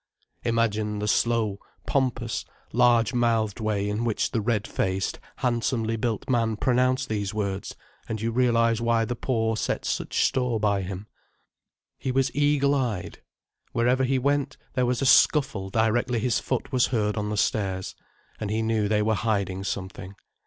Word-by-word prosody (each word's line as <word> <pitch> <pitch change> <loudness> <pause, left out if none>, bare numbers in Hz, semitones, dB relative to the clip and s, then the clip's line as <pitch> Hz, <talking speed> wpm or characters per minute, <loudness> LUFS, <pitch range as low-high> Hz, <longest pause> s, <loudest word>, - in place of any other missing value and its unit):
Imagine 110 -3 0
the 105 0 -2
slow, 110 -3 +1 0.3
pompous, 120 -4 -1 0.3
large 120 0 +4
mouthed 115 -3 +1
way 105 -2 -1
in 105 +3 -1
which 115 -3 0
the 115 - 0
red 105 -1 0
faced, 95 0 -2 0.2
handsomely 115 -2 0
built 115 -1 -2
man 115 -4 +1
pronounced 130 +2 +2
these 105 -1 -2
words, 100 -2 -3 0.3
and 110 - -2
you 115 +2 -1
realize 115 -2 +2
why 115 -1 +2
the 120 - -3
poor 115 -3 0
set - - -2
such - - 0
store 125 -3 0
by 100 -2 +1
him. 95 +2 -6 0.9
He 130 - -2
was 135 0 +1
eagle 145 -1 +3
eyed. 120 -9 -2 0.5
Wherever 125 +3 +2
he 130 +1 +2
went, 140 +1 0 0.2
there 125 -2 +1
was 125 +2 0
a - - +1
scuffle 130 -8 +4
directly 115 +4 +1
his 115 +1 +1
foot 130 - -3
was 125 -2 +3
heard 105 -4 0
on 105 -1 -2
the 105 - -2
stairs. 95 -3 -1 0.5
And 105 - -3
he 110 +2 0
knew 110 -2 +1
they 105 0 +2
were 110 +1 +2
hiding 100 -3 -1
something. 95 0 -5
115 Hz, 160 wpm, -26 LUFS, 105-125 Hz, 0.9 s, large